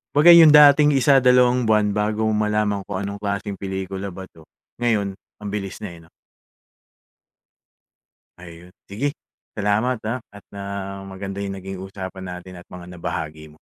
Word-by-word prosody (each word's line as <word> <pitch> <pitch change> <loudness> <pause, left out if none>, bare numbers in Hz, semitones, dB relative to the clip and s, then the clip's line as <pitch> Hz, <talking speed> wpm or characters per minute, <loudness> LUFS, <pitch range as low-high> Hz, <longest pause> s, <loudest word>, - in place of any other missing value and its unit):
Kumbaga 155 +4 +8
'yung 165 -3 +9
dating 150 0 +7
isa, 135 +1 +4
dalawang 125 -1 +3
buwan 105 -1 +2
bago 105 +1 -1
mo 110 - +1
malaman 105 -1 0
kung 100 - -4
anong 100 +1 -5
klaseng 100 -1 -4
pelikula 95 0 -5
ba 95 0 -8
ito, 80 -4 -17 0.3
ngayon 110 -5 0 0.3
ang 105 - -4
bilis 100 -2 -5
na - - -5
eh, 85 - -13
'no. - - -28 2.3
Ayun, 85 0 -13 0.2
sige. 140 +9 -4 0.4
Salamat 105 +5 0
ah. 120 +3 -3
At, 100 0 -15
ah, 100 -1 -6
maganda 95 +1 -6
'yung 100 -1 -5
naging 95 0 -8
usapan 95 0 -8 0.2
natin 90 0 -11
at - - -22
mga 90 -1 -10
nabahagi 80 -2 -6
mo. 75 - -20
100 Hz, 160 wpm, -22 LUFS, 95-110 Hz, 2.3 s, yung